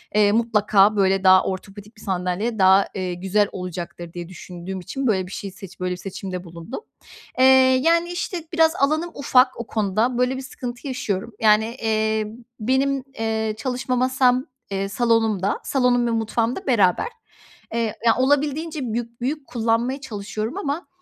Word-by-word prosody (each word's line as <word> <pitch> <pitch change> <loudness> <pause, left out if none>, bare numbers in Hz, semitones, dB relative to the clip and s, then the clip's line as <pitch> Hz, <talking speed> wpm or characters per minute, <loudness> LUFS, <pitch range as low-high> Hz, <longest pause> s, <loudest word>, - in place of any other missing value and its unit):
eee, 205 -1 +5
mutlaka, 215 -2 +3
böyle, 195 -1 +2
daha 185 0 +7
ortopedik 200 +3 -7
bir - - -15
sandalye 190 +4 -2
daha, 190 +1 +6
eee, 185 -2 -2
güzel 190 +4 +1
olacaktır 175 -2 -6
diye 175 -1 -7
düşündüğüm 185 +1 -7
için, 265 +9 -3
böyle, 190 -5 +1
bir 185 - -11
şey 200 -1 -6
seç 190 0 -12
böyle 180 0 -2
bir 180 - -3
seçimde 185 -1 -6
bulundum. 170 - -8 0.6
Eee, 260 - +6 0.4
yani, 335 +2 +3
işte, 350 -1 -3
biraz 325 0 +4
alanım 310 +4 +1
ufak 255 -3 +3
o 235 - -5
konuda. 220 +3 0
Böyle 250 +1 +1
bir - - -5
sıkıntı 245 0 -7
yaşıyorum. 230 -4 -3
Yani, 220 +1 +3
iii, 220 -1 +1 0.3
benim, 265 +4 +1 0.2
eee, 220 -1 -1
çalışma 255 +1 -2
masam, 255 0 +2 0.3
eee, 195 0 -2
salonumda. 220 -3 +1
Salonum 250 -2 +2
ve - - 0
mutfağım 225 +1 0
da 385 - -8
beraber, 200 -8 +3 0.7
eee, 230 -2 -1
ya, 230 - +5
olabildiğince 290 +4 +1
büyük 235 0 -5
büyük 280 +2 -3
kullanmaya 235 +3 0
çalışıyorum 215 - -5
ama, 310 -2 -3
225 Hz, 155 wpm, -22 LUFS, 195-255 Hz, 0.7 s, daha